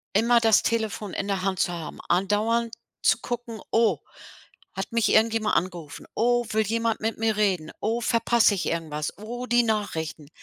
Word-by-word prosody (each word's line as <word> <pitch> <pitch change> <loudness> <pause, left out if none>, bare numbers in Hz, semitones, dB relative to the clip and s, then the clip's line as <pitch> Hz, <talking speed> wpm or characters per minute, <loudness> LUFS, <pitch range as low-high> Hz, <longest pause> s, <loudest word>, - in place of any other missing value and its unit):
immer 235 +3 +5
das 225 -2 +5
Telefon 220 -4 -2
in 200 - -3
der 195 -2 -1
Hand 190 -1 -1
zu - - +1
haben, 165 -4 -7
andauernd 215 +6 +1 0.3
zu - - +3
gucken: 240 -2 -5
„Oh, 225 -1 +3 0.7
hat 195 - -5
mich 230 -2 +1
irgendjemand 220 -1 +3
angerufen. 175 -5 -4
Oh, 240 +1 +2
will 220 0 +1
jemand 230 +1 0
mit 225 +1 -2
mir 225 -1 +1
reden. 190 -7 0
Oh, 225 +3 -1
verpasse 235 -2 +3
ich 185 - -3
irgendwas. 155 -2 -3
Oh, 240 +4 -6
die 240 -1 +4
Nachrichten.“ 185 -9 -3
220 Hz, 165 wpm, -25 LUFS, 190-230 Hz, 0.7 s, immer